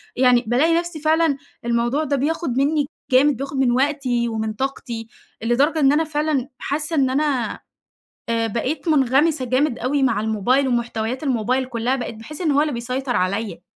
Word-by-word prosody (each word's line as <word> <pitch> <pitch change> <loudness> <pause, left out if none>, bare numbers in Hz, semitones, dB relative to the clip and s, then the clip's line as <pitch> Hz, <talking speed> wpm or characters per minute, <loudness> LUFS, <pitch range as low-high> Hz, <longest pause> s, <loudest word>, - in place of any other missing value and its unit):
يعني 250 -1 +4
بالاقي 295 +8 +3
نفسي 345 -2 -6
فعلًا 315 -2 +2 0.3
الموضوع 235 +5 +1
ده 285 -1 0
بياخد 285 -1 -1
منّي 290 +1 +2 0.3
جامد، 270 0 +4
بياخد 275 0 -5
من 265 -2 +3
وقتي 255 -2 +1
ومن 220 -1 -2
طاقتي، 240 -2 -4 0.4
لدرجة 280 +7 +2
إن 275 -1 +5
أنا 320 +2 +3
فعلًا 295 -3 -1
حاسّة 305 +3 -2
إن 270 -3 +3
أنا 275 -2 0 0.7
آآ، 230 0 +1
بقيت 255 - -3
مُنغمِسة 285 0 +3
جامد 255 +1 +1
أوي 270 +3 0
مع 230 -5 +2
الموبايل 220 +6 +1
ومحتويات 240 +1 -2
الموبايل 255 0 0
كلّها، 245 +1 -1
بقيت 245 -3 -5
باحسّ 295 +10 -9
إن 315 - +1
هو 285 +1 +3
اللي 300 -3 0
بيسيطر 250 +2 -3
عليَّ. 190 -1 -1
265 Hz, 165 wpm, -21 LUFS, 235-295 Hz, 0.7 s, إن